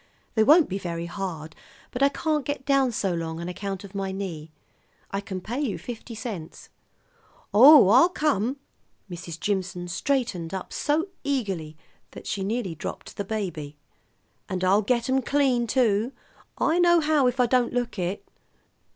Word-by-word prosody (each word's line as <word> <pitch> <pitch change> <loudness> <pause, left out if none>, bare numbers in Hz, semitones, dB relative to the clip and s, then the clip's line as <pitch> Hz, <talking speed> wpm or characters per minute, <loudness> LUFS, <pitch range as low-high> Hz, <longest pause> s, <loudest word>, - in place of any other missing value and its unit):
They 220 - +4
won't 305 +6 +6
be 195 +1 -3
very 170 -2 -4
hard, 170 -4 -6 0.4
but 250 - -5
I 275 - +6
can't 305 0 -1
get 285 -1 -4
down 275 -3 +3
so 195 -5 -1
long 165 -1 -4
on 170 - -5
account 195 +1 -5
of 200 -1 -11
my 195 -1 -3
knee. 175 -5 -5 0.6
I 195 - -2
can 195 -2 -5
pay 235 +9 -4
you 255 -9 -1
fifty 235 -1 -8
cents." 205 -8 -7 0.8
"Oh, 270 +2 +9
I'll 260 - +6
come." 285 - 0 0.5
Mrs. 170 -1 -7
Jimson 185 -2 -2
straightened 190 -4 -1
up 190 - -6
so 315 +6 0
eagerly 195 - -2 0.4
that - - -10
she 195 - -2
nearly 210 -3 -2
dropped 160 - -7
the 200 - -3
baby. 180 -9 -4 0.7
"And 185 -1 -3
I'll 195 +3 +4
get 235 +3 0
'em 265 0 +2
clean, 260 -3 +1
too. 230 0 +1 0.4
I 335 - +2
know 345 -1 +5
how 300 -4 +3
if 250 +1 -1
I 250 - +5
don't 245 0 +2
look 245 -4 -2
it." 180 +2 -3
210 Hz, 165 wpm, -25 LUFS, 185-265 Hz, 0.8 s, Oh